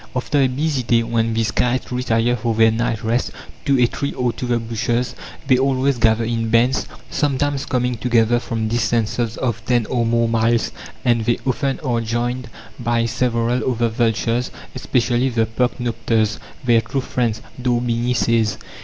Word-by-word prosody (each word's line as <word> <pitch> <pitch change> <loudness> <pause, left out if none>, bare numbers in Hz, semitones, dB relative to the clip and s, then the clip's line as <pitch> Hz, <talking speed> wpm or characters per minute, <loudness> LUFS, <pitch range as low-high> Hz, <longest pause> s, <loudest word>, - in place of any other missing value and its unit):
After 130 +3 0
a 135 - +4
busy 140 +2 -1
day, 115 -1 +2
when 115 -1 0
these 115 0 +1
kites 125 +2 0
retire 120 -1 +1
for 115 -1 -1
their 110 0 +5
night 115 0 -1
rest 115 +3 0 0.4
to 140 -2 +3
a 125 - +6
tree 140 +4 -3
or 125 -2 -1
to 125 - -5
the 120 -1 +2
bushes, 115 +2 -1 0.3
they 130 -2 +4
always 135 -1 +1
gather 115 0 +3
in 115 0 -1
bands, 120 +3 +2 0.2
sometimes 145 -1 0
coming 125 0 0
together 120 0 +2
from 115 -2 -3
distances 115 0 0
of 115 -3 -2
ten 120 -2 +2
or 120 +2 0
more 115 0 +2
miles, 115 0 +1 0.3
and 120 -2 +2
they 120 0 +2
often 135 +2 0
are 120 -5 0
joined 120 +2 -2 0.3
by 120 -1 +1
several 120 +1 0
other 120 -1 0
vultures, 115 +1 0 0.2
especially 125 0 +1
the 115 -2 +1
percnopters, 115 -2 0 0.2
"their 120 -2 +4
true 120 +5 -3
friends," 115 -4 -2 0.2
D'Orbigny 120 0 0
says. 115 -3 +1
120 Hz, 160 wpm, -20 LUFS, 115-125 Hz, 0.4 s, a